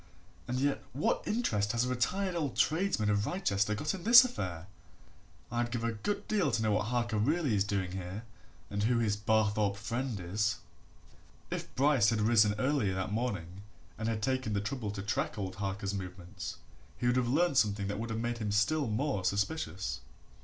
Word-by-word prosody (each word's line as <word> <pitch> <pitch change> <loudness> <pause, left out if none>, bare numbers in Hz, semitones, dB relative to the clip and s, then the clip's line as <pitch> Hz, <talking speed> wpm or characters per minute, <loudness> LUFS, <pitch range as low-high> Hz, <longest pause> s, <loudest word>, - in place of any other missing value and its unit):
And 125 +1 -1
yet 140 +1 0
what 140 - +1
interest 110 - 0
has 120 +1 +1
a - - -2
retired 180 +10 0
old 155 -6 -2
tradesman 160 - +2
of 105 +1 +1
Wrychester 105 - 0
got 150 +8 -1
in 185 -3 -6
this 240 +3 +9
affair? 90 - -4 0.9
I'd 120 0 0
give 120 -1 -3
a 115 - +1
good 200 - -3
deal 200 -8 +2
to 115 - 0
know 110 - +2
what 105 0 +1
Harker 120 -2 0
really 145 +3 +1
is 100 -2 +3
doing 100 -3 -2
here 95 +3 -5 0.5
and 100 0 -1
who 120 +3 +2
his 110 -3 +1
Barthorpe 105 -1 +1
friend 115 +2 -3
is." 100 +3 0 1.0
If - - -5
Bryce 135 -5 +4
had 115 -1 +1
risen 110 -1 +4
earlier 120 -6 +1
next 95 +1 -2
morning, 100 -6 -3 0.3
and 110 +3 -2
had 110 -2 -2
taken 130 -3 0
the 100 - +1
trouble 115 0 -3
to 100 -1 -5
track 140 +7 -1
old 95 -2 -4
Harker's 100 0 -3
movements, 90 -2 -6 0.4
he - - -3
would 120 0 +3
have 125 -2 +1
learnt 155 +1 +2
something 100 -2 +1
that 100 +1 -3
would 115 +1 -4
have 110 - -2
made 120 +1 -2
him 105 -2 -2
still 120 +8 +2
more 110 -2 -1
suspicious. 100 - -1
110 Hz, 190 wpm, -31 LUFS, 100-130 Hz, 1.0 s, this